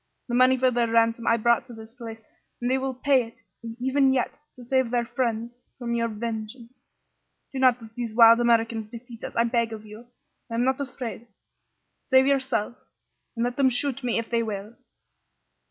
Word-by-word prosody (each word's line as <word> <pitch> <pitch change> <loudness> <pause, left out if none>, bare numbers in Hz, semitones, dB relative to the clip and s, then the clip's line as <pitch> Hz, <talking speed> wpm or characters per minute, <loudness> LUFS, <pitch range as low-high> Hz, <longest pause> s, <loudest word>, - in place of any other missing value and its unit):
The - - -3
money 255 +1 +5
for 255 0 +3
their 240 -1 +1
ransom 230 0 +2
I 230 - +4
brought 235 +2 +2
to 245 - -10
this 220 0 -12
place, 225 -2 -9 0.4
and 245 +1 -1
they 265 - +2
will 265 -1 -3
pay 270 0 +3
it 230 - -17 0.4
even 265 +2 +3
yet 255 +2 -1 0.2
to 250 - -12
save 260 0 +1
their 240 0 0
friends 235 -1 -2 0.2
from 240 -2 -3
your 230 0 +1
vengeance. 230 +3 -7 0.7
Do 265 - -3
not 255 -2 +4
let 225 -1 -13
these 235 -2 -5
wild 230 0 +8
Americans 230 -2 +1
defeat 235 0 -11
us, - - -6
I 230 - +3
beg 235 -1 0
of 215 -1 -9
you. 215 +3 -12 0.4
I 230 - -4
am 235 - +1
not 265 +2 +1
afraid. 245 -3 -6 0.7
Save 260 0 +4
yourself, 265 -5 0 0.6
and 230 - -1
let 245 +2 -2
them 270 -2 +4
shoot 265 +1 -1
me, 245 -2 0
if 230 0 -2
they 235 -1 0
will!" 210 0 -5
235 Hz, 190 wpm, -25 LUFS, 230-255 Hz, 0.7 s, wild